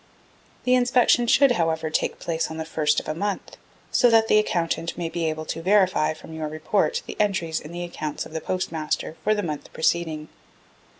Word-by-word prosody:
The 250 - +3
inspection 245 -1 +4
should, 275 +2 +5
however, 160 -6 0
take - - 0
place 165 -1 -2
on 160 - -6
the 160 - -3
1st 155 -2 +1
of - - -14
a 155 - -1
month, 200 +4 -4 0.3
so 245 - +5
that 225 -1 +4
the 215 - +6
Accountant 170 -4 -1
may 170 -2 -2
be 165 -1 -1
able 155 0 -4
to 165 - -4
verify 185 -5 +3
from 160 - -12
your 160 -1 -3
report 200 - 0
the - - -7
entries 190 -6 0
in 150 - -10
the 175 0 -5
accounts 155 -3 -4
of - - -12
the 160 - -3
Postmaster 160 -4 -2
for 215 - +3
the 205 - -2
month 150 -4 -5
preceding. 160 -2 0
165 Hz, 195 wpm, -24 LUFS, 160-210 Hz, 0.3 s, the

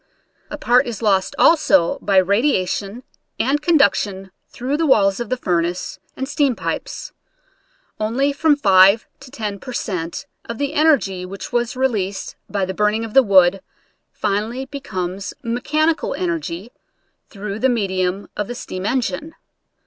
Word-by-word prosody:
A - - -5
part 245 +1 +3
is 230 -1 -5
lost 195 -3 +2
also 195 - +4
by 195 -2 +1
radiation 200 +1 +1 0.4
and 280 +4 +1
conduction 210 - +2 0.2
through 260 +4 -3
the 320 +1 +1
walls 195 -7 +3
of 240 -3 -4
the 255 - 0
furnace 175 -5 -2 0.2
and 265 - -3
steam 280 -3 +1
pipes. - - -5 0.9
Only 250 +7 0
from 300 +1 +3
5 195 -4 +5
to 265 0 -13
10 215 -6 -5
per 255 - -8
cent, 180 -8 -4 0.2
of 230 - -6
the 285 +2 -2
en 310 +1 +3
ergy 195 - +2
which 195 +1 -8
was 240 0 0
released 210 -7 -2
by 200 -2 -1
the 190 - -4
burning 210 +3 +1
of 220 - -9
the 270 - +8
wood 190 -4 +4 0.5
finally 215 +6 -2
becomes 195 -9 -5
mechanical 305 +7 0
energy 170 +4 -3 0.6
through 205 0 -6
the 265 - +3
medium 190 -4 -1
of 210 - -3
the 245 - -5
steam 185 -3 -5
engine. 260 - -2
215 Hz, 150 wpm, -20 LUFS, 190-265 Hz, 0.9 s, the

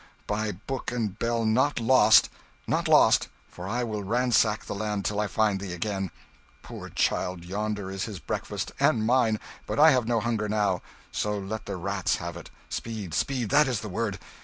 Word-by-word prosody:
by 105 0 -1
book 120 +9 -5
and 110 -4 -3
bell, 115 -1 0
not 125 +6 +2
lost! 115 -2 +6 0.4
Not - - 0
lost, - - +5 0.2
for 90 +1 -9
I 120 +4 -1
will 110 -3 -3
ransack 115 0 +2
the - - -4
land 105 -1 -2
till 105 0 0
I 105 - +1
find 105 -2 +1
thee 95 -2 -5
again. 95 +1 -2 0.5
Poor - - -8
child, 90 -1 -1
yonder 100 +1 -3
is 95 0 -3
his 105 -4 -6
breakfast 75 - -4
and 110 - +3
mine, 115 -3 +3 0.3
but - - -3
I 155 +1 +8
have 125 -4 +2
no 120 -1 +2
hunger 110 -2 -1
now; 100 -4 +1 0.3
so, 105 0 -1
let 105 +2 -5
the 100 - -3
rats 95 +1 0
have 85 -1 -5
it 85 - -9 0.2
speed, 110 -7 -5
speed! 125 -6 -1
that 145 +1 +5
is 120 -5 -1
the 105 - -6
word!" 90 - -2
105 Hz, 185 wpm, -27 LUFS, 100-115 Hz, 0.5 s, I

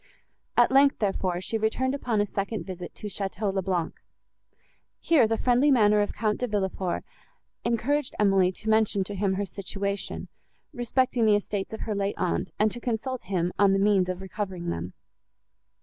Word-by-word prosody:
At 240 +1 +5
length, 275 +1 +5
therefore, 190 -3 -1
she 225 +4 -2
returned 255 +5 0
upon 245 -6 -1
a - - +2
second 200 +2 -3
visit 180 -2 -7
to - - -10
Château 200 0 -2
le 195 - 0
Blanc. 180 -3 -1 1.1
Here 305 -9 +4
the 225 0 0
friendly 250 +5 +3
manner 210 -6 +5
of 205 - -1
Count 215 -2 0
De 250 - -1
Villefort 190 -4 -2 0.6
encouraged 255 +5 0
Emily 195 -3 +4
to 210 +4 -9
mention 220 -2 +3
to 205 - -6
him 195 -1 0
her 200 +1 -1
situation, 200 +1 -4 0.5
respecting 245 -2 +1
the 210 - +6
estates 205 -1 -2
of 220 - -6
her 220 - -2
late 200 0 -1
aunt, 180 - -1
and 215 0 +3
to 240 - -6
consult 240 -1 -3
him 180 -2 -1
on 200 -1 +5
the - - +3
means 195 -2 +3
of 185 0 -3
recovering 190 -2 -4
them. 85 +2 -5
205 Hz, 175 wpm, -27 LUFS, 190-230 Hz, 1.1 s, the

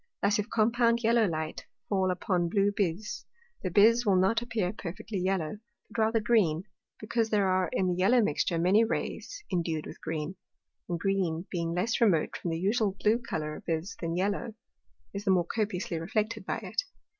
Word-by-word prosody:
Thus 210 +2 +3
if 210 +3 -2
compound 235 +1 +2
Yellow 230 -1 +4
Light 155 -2 -4 0.2
fall 190 -2 +1
upon 180 -1 0
blue 200 +2 +2
Bise, 195 +1 -2 0.4
the 185 - -2
Bise 225 +6 +5
will 200 -4 +3
not 195 +5 +3
appear 225 -6 -1
perfectly 195 +1 -5
yellow, 185 -1 -1 0.3
but 215 - -1
rather 225 +1 +3
green, 205 -8 +2 0.4
because 225 +1 -1
there 205 -3 +2
are 185 -2 +2
in 190 - +1
the - - +1
yellow 190 +8 +4
mixture 170 -4 +1
many 185 +6 +4
Rays 420 - -3
indued 165 -4 -1
with - - -10
green, 160 +3 -4 0.5
and 170 -1 -1
green 185 -3 0
being 170 -2 -2
less 220 +7 0
remote 185 -9 +3
from 175 - -4
the 165 - -1
usual 200 +1 +1
blue 220 +3 +3
Colour 155 -10 -4
of - - -14
Bise 170 +6 -2
than 165 -1 -2
yellow, 205 +4 -1 0.6
is 200 0 -4
the - - +1
more 180 -2 +4
copiously 190 -4 -2
reflected 215 +4 -2
by - - -1
it. - - -1
195 Hz, 180 wpm, -29 LUFS, 175-220 Hz, 0.6 s, Bise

